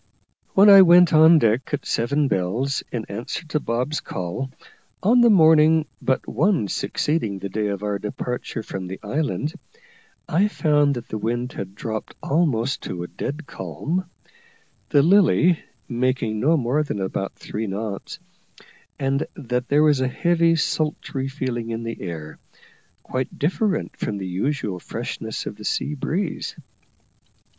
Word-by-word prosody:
When 200 +2 +7
I 200 -1 +10
went 175 -1 +7
on 160 +2 +8
deck 115 -2 +1
at - - -10
seven 140 +5 +1
bells, 115 +8 -1
in 115 -3 -3
answer 115 +10 -5
to 155 - 0
Bob's 125 +4 -1
call, 90 +9 -4 0.5
on 240 +5 +5
the 240 - +6
morning 160 -4 +6 0.2
but 130 - 0
one 160 - +1
succeeding 115 - -1
the 100 +1 -5
day 105 +2 -1
of 100 0 -3
our 105 -1 -1
departure 115 +2 -4
from 95 -3 -6
the 95 +1 -7
island, 145 +6 -2 0.7
I 190 +7 +3
found 145 -7 +2
that 120 -1 -6
the 110 - -4
wind 120 +3 -2
had 95 0 -7
dropped 110 0 -5
almost 135 -5 +1
to 85 -1 -4
a - - -6
dead 150 - -5
calm, 150 - -4 0.8
the 140 - +4
Lily 180 -1 +4 0.3
making 120 -3 -1
no 155 +8 +3
more 130 +3 +1
than 145 -9 -3
about 95 0 -3
three 110 +1 -5
knots, 100 0 -5 0.8
and 135 +1 0
that 125 0 -3
there 145 +2 +4
was 150 -3 +4
a 130 - +2
heavy 170 +4 +2
sultry 150 -4 -1
feeling 130 -4 -3
in 115 0 -3
the 115 0 -5
air, 80 -4 -7 0.6
quite 130 0 -4
different 185 +6 0
from 105 - -3
the 95 - -5
usual 95 0 -2
freshness 110 +1 -5
of 100 - -6
the 105 - -10
sea 145 - -1
breeze. 160 +5 -3
130 Hz, 150 wpm, -23 LUFS, 110-155 Hz, 0.8 s, I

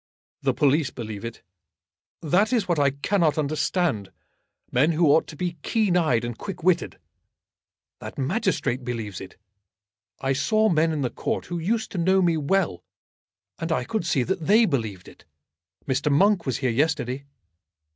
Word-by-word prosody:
"The - - +1
police 145 0 +2
believe 110 -4 -7
it. 115 0 -7 0.8
That 190 - +2
is 230 -6 +1
what 170 -4 +1
I 140 -1 +4
cannot 155 +3 +1
understand; 150 - 0 0.6
men 145 +7 +3
who 165 +2 +2
ought 160 - +3
to 155 - -9
be 175 +1 -3
keen 210 -1 +1
eyed 155 -9 +2
and 120 -1 -4
quick 190 - -7
witted. 175 -1 +1 1.0
That - - -9
magistrate 140 - -1
believes 115 -6 -5
it. 95 - -11 0.8
I 135 0 0
saw 215 +11 +2
men 160 -1 +2
in 155 -2 -2
the 125 - -1
Court - - -3
who 175 -1 -4
used 220 +7 -1
to 185 - -3
know 190 +3 +3
me 175 -3 +3
well, 160 - 0 0.8
and 165 0 -3
I 160 - +1
could 215 - -2
see 135 -6 +2
that 170 +1 -3
they 220 +4 +6
believed 110 - -3
it. - - -15 0.6
Mr. 140 +2 0
Monk 190 +3 +3
was 130 - 0
here 130 -3 0
yesterday." 140 0 0
155 Hz, 165 wpm, -24 LUFS, 130-180 Hz, 1.0 s, they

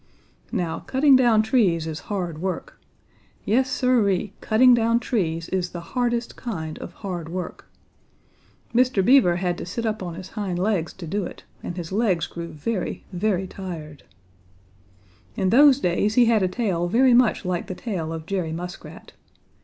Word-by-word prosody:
"Now 175 -7 -2
cutting 270 +1 +4
down 235 -4 +4
trees 200 -9 +2
is 160 -1 -5
hard 175 -6 -3
work. 185 -1 -4 0.6
Yes, 255 +6 +2
Siree, 210 -7 +1
cutting 245 +3 +5
down 230 0 +3
trees 165 -10 -2
is 180 -2 -1
the 175 - -4
hardest 240 -2 -1
kind 160 -10 -5
of - - -8
hard 175 -4 -4
work. 180 +1 -6 1.0
Mr. 245 -5 +3
Beaver 245 -9 +5
had 175 -1 -2
to - - -5
sit 230 +6 -4
up 215 -1 -2
on 175 -2 -5
his 185 +1 -9
hind 200 -5 -3
legs 185 -3 0
to 185 - -9
do 200 +5 -2
it, - - -9 0.2
and 175 - -6
his 170 -1 -6
legs 195 -5 +1
grew 170 0 -7
very, 175 +6 -4
very 190 0 0
tired. 165 -6 -8 1.3
In 190 -1 0
those 280 +1 +7
days 205 +1 0
he 245 - +6
had 225 -2 +3
a 185 - +2
tail 185 -4 -1
very 250 +7 +4
much 240 -4 +3
like 180 -1 -2
the 185 - -5
tail 180 -7 -4
of 160 -1 -6
Jerry 180 -3 -2
Muskrat. 180 +3 -8
190 Hz, 165 wpm, -24 LUFS, 175-230 Hz, 1.3 s, those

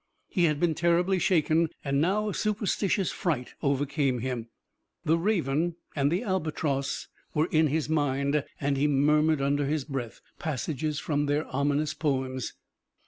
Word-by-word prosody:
He 175 -3 +2
had 150 -3 +1
been 170 -1 +2
terribly 175 +3 +2
shaken, 165 -2 +3 0.2
and 140 0 +1
now 200 +6 +1
a 205 - -2
superstitious 205 -2 0
fright 150 -10 -2
overcame 140 -1 +1
him. 120 -1 -3 0.6
The 160 - +4
raven 170 -4 +1 0.2
and 140 0 +2
the 180 +7 0
albatross 155 - -1 0.3
were 155 +1 +3
in 155 0 +4
his 150 +1 0
mind 145 -1 +1 0.2
and 140 0 0
he 145 +2 +3
murmured 150 +1 +3
under 140 0 +1
his 150 -1 -1
breath 130 -6 -5 0.2
passages 155 0 -2
from 145 -1 0
their 145 +2 +1
ominous 145 +2 +1
poems. 130 -5 -2
150 Hz, 145 wpm, -28 LUFS, 140-165 Hz, 0.6 s, The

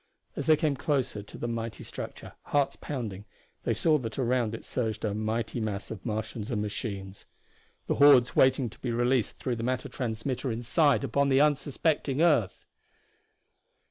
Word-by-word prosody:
As - - -4
they 155 -1 +6
came 150 -2 +1
closer 135 -6 -1
to 100 - -12
the 120 - -3
mighty 115 -1 -4
structure, - - -8
hearts 145 -1 +1
pounding, 110 -8 -5 0.4
they - - +2
saw 155 -2 +3
that 115 -3 -6
around 120 -3 +1
it - - -10
surged 110 -3 -2
a 105 - -1
mighty 110 +2 -2
mass 105 -2 -3
of 105 -4 -7
Martians 110 -1 -4
and 110 - -1
machines. 100 -2 -5 0.6
The - - 0
hordes 140 -4 +6
waiting 130 -1 +4
to - - -15
be 125 - -3
released 120 0 +1
through 125 -3 -2
the 115 - -4
matter 130 +1 -1
transmitter 125 +2 -3
inside 140 +6 +2
upon 140 +2 +1
the 135 0 +4
unsuspecting 145 -1 +1
earth! 150 - +2
120 Hz, 165 wpm, -28 LUFS, 110-140 Hz, 0.6 s, they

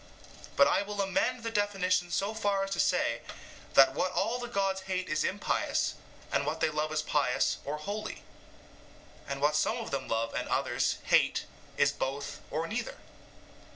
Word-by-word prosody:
But 140 - +7
I 190 - +3
will 205 0 -5
amend 215 +5 0
the 230 - -2
definition 195 -4 +1
so 195 +5 0
far 205 -3 0
as 195 - -4
to - - -2
say - - +2 0.5
that 135 -1 +8
what 180 +6 0
all 235 +5 0
the 245 - -4
gods 195 -4 0
hate 185 -1 -2
is 155 0 0
impious, 200 +2 0 0.4
and 140 - +2
what 150 +3 -2
they - - +2
love 155 0 -1
pious 135 -3 +1
or 145 +2 -2
holy; 205 +7 -5 1.0
and 140 0 -4
what 150 +1 +4
some 215 +9 +2
of 230 - -5
them 140 - -2
love 115 0 -1
and - - -3
others - - +1
hate - - +3 0.3
is - - +4
both 135 +2 -4
or 160 +2 -1
neither. 235 - -4
185 Hz, 170 wpm, -30 LUFS, 150-205 Hz, 1.0 s, that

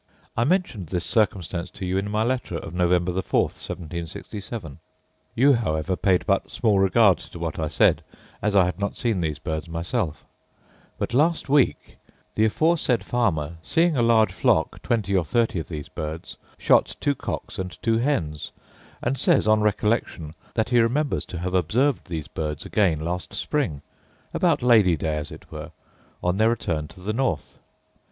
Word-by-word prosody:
I 115 - +2
mentioned 150 - 0
this 85 0 -2
circumstance 90 -4 0
to 100 - -7
you 95 +1 0
in 100 +1 -3
my 105 +1 +1
letter 120 -7 -1
of 80 - -8
November 90 0 +2
the 95 +2 -1
4th, - - -1
1767 85 - -6 0.6
(you, 140 +4 +5
however, 90 -6 0
paid 95 -1 +2
but 100 -1 +1
small 105 -4 +2
regard 95 -2 +5
to - - -11
what 80 -2 -4
I 80 - 0
said, 75 - +3 0.4
as 105 0 0
I 95 -2 +6
had 90 0 -3
not 100 0 -2
seen 110 -7 0
these 80 -3 -1
birds 80 0 -4
myself); 85 - -3 0.7
but - - -3
last 155 +3 +2
week, 140 -2 +1 0.3
the 110 - +3
aforesaid 150 0 +2
farmer, 85 -10 0
seeing 165 - +2
a 125 - +2
large 115 -2 +4
flock, - - +1
twenty 105 -4 0
or 90 - +3
thirty 115 +2 +1
of 80 - -6
these 75 -4 -6
birds, 80 +2 -6 0.2
shot - - +3
two 145 - +1
cocks - - -5
and 90 -1 -5
two 115 0 +2
hens: 85 - -1 0.5
and 130 +3 -1
says, - - +3
on 110 0 +4
recollection, 105 -7 0 0.2
that 110 - 0
he 120 -1 +4
remembers 130 +6 +1
to 90 - -6
have 90 +2 -3
observed 115 - +1
these 80 -4 -4
birds 75 -2 -4
again 90 -8 +1
last 90 +3 -4
spring, 80 - -2 0.5
about - - +2
Lady 105 -9 +5
day, 75 +1 -1
as 75 +1 -4
it - - -12
were, - - -7 0.5
on 90 +2 +1
their 110 +2 +4
return 80 -10 -1
to 80 +4 -16
the 105 +4 -2
north. 115 - -2
95 Hz, 175 wpm, -24 LUFS, 85-115 Hz, 0.7 s, I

